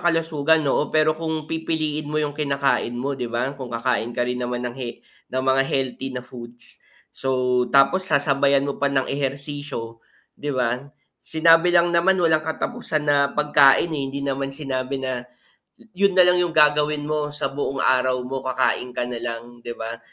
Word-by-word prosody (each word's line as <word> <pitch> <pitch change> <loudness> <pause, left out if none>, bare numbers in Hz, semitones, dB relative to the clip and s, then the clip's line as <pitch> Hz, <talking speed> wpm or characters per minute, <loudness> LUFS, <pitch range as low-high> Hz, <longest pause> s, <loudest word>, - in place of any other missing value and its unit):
kalusugan, 160 -2 +2
oo. 145 +2 0
Pero 155 0 +2
kung 160 -1 -4
pipiliin 155 -2 -3
mo 155 - -3
yung 150 -1 -1
kinakain 140 -4 -1
mo 135 +3 -3
di 125 -3 -5
ba, 120 +3 -2
kung 130 -2 -8
kakain 120 0 -1
ka 120 - 0
rin 125 0 -4
naman 125 0 -4
he 125 -2 -8 0.3
ng 130 +1 -2
mga 135 0 +3
healthy 135 0 -3 0.2
foods. 120 -1 -1 0.3
So, 125 -1 +1
tapos 165 +8 +6
sasabayan 140 -2 +4
mo 140 - -5
pa 140 - +2
ng 135 -1 +1
ehersisyo, 140 -4 -3 0.3
di 145 - -7
ba. 125 -2 -1 0.4
Sinabi 165 +2 +5
lang 175 0 +3
naman 180 +3 +3
walang 160 -3 +2
katapusan 160 0 -1
na 140 -1 +3
pagkain, 150 +2 +3
eh, 150 - -3
hindi 140 - -6
naman 135 0 -2
sinabi 135 -2 -3
na 130 -2 -4 0.7
yun 195 0 +1
na 185 - +7
lang 180 0 +3
yung 175 -2 -2
gagawin 150 0 +3
mo 150 0 -2
sa 140 -2 +1
buong 140 -1 -3
araw 130 0 +2
mo 135 +1 -4
kakain 130 -1 -1
ka - - -1
nalang, 120 0 -7
di 120 0 -7
ba. 115 +1 -6
140 Hz, 170 wpm, -22 LUFS, 130-155 Hz, 0.7 s, na